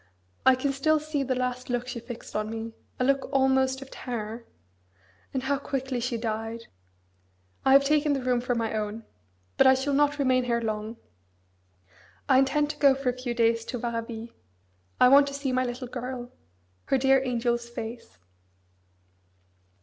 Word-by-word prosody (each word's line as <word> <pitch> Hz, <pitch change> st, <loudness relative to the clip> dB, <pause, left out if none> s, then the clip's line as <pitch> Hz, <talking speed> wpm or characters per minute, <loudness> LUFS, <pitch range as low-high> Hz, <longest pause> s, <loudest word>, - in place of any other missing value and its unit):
I 260 Hz, -, +8 dB
can 275 Hz, +2 st, -1 dB
still 310 Hz, +3 st, +2 dB
see 305 Hz, -1 st, -2 dB
the 260 Hz, -1 st, -1 dB
last 250 Hz, 0 st, -3 dB
look 245 Hz, 0 st, -1 dB
she 245 Hz, -, -4 dB
fixed 235 Hz, 0 st, -9 dB
on 215 Hz, 0 st, -1 dB
me, 225 Hz, 0 st, -5 dB, 0.3 s
a -, -, +2 dB
look 275 Hz, +1 st, +1 dB
almost 265 Hz, -1 st, +2 dB
of 270 Hz, -, -17 dB
terror! 230 Hz, -1 st, -6 dB, 0.8 s
and 260 Hz, -2 st, -2 dB
how 275 Hz, +1 st, 0 dB
quickly 265 Hz, -2 st, -3 dB
she 240 Hz, 0 st, -2 dB
died! 225 Hz, 0 st, -4 dB, 1.0 s
I 265 Hz, -, +6 dB
have 275 Hz, 0 st, +7 dB
taken 295 Hz, +1 st, +2 dB
the 270 Hz, -2 st, -2 dB
room 250 Hz, -1 st, +1 dB
for 245 Hz, 0 st, -1 dB
my 225 Hz, -1 st, -1 dB
own. 215 Hz, +1 st, -3 dB, 0.5 s
But 270 Hz, -, +6 dB
I 260 Hz, -, +7 dB
shall 270 Hz, +2 st, -1 dB
not 290 Hz, +1 st, +3 dB
remain 255 Hz, -3 st, +2 dB
here 235 Hz, -1 st, +1 dB
long. 220 Hz, 0 st, -4 dB, 1.3 s
I 260 Hz, -2 st, +5 dB
intend 295 Hz, +2 st, +2 dB
to -, -, -14 dB
go 280 Hz, -2 st, +6 dB
for 270 Hz, -1 st, -1 dB
a -, -, 0 dB
few 250 Hz, -1 st, -4 dB
days 230 Hz, -1 st, +2 dB
to 250 Hz, -, -4 dB
Varaville. 230 Hz, -1 st, -4 dB, 0.7 s
I -, -, +7 dB
want 280 Hz, +2 st, +7 dB
to 280 Hz, -, -5 dB
see 280 Hz, -2 st, -2 dB
my 255 Hz, 0 st, +1 dB
little 245 Hz, +1 st, -5 dB
girl: 245 Hz, 0 st, -6 dB, 0.5 s
her 270 Hz, -, +2 dB
dear 270 Hz, 0 st, +4 dB
angel's 240 Hz, -1 st, -1 dB
face. 230 Hz, -, -7 dB
255 Hz, 170 wpm, -27 LUFS, 235-270 Hz, 1.3 s, I